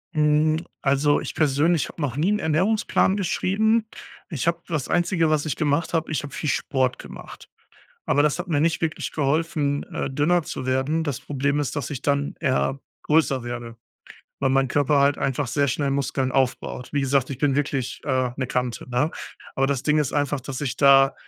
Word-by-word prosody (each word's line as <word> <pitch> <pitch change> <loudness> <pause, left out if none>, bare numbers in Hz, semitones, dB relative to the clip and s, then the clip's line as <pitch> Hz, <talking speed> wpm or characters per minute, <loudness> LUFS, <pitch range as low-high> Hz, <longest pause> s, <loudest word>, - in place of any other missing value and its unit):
Mhm, 150 +1 +3 0.2
also, 140 +1 +2
ich - - -5
persönlich 150 0 +2
hab - - -13
noch 145 -6 -2
nie 170 +6 +2
'n 210 - +2
Ernährungsplan 190 +4 +1
geschrieben. 215 +4 +1 0.4
Ich 155 -4 -3
hab 170 0 0
das 155 -6 -2
Einzige, 175 -2 +1
was 155 0 +1
ich 150 - -1
gemacht 155 +2 0
hab 165 -1 0
ich 155 - -2
hab 145 - -8
viel 150 - -2
Sport 130 -2 0
gemacht. - - -11 0.6
Aber 145 +2 +3
das 150 +3 +1
hat 180 - -4
mir 150 -4 +1
nicht 165 +1 +1
wirklich 160 -1 -2
geholfen, 150 -1 0
äh, - - -2
dünner 155 +5 +2
zu 130 - -6
werden. 135 +5 0
Das 145 -6 -3
Problem 140 +1 -1
ist, 145 - -2
dass 145 - -3
ich 140 -3 -5
dann 140 0 0
eher 135 -1 0 0.2
größer 150 -5 +2
werde, 120 -1 -6 0.6
weil 135 -1 +1
mein 135 -1 +2
Körper 145 +1 +2
halt 140 +1 +3
einfach 135 0 -1
sehr 140 +2 +1
schnell 140 +2 0
Muskeln 135 -1 -1
aufbaut. 125 -1 -1
Wie 145 - +1
gesagt, 135 -1 +1
ich 135 - -5
bin 140 -1 +1
wirklich 140 -3 -2
äh, 130 -3 0
'ne 130 -1 -2
Kante, 125 -1 -3
ne? 125 +6 +1 0.5
Aber 135 - +2
das 135 -2 -1
Ding 150 +1 +2
ist 145 -3 0
einfach, 145 -1 0
dass 130 +1 -6
ich 130 -3 -3
da 135 -1 +6
145 Hz, 195 wpm, -24 LUFS, 135-155 Hz, 0.6 s, da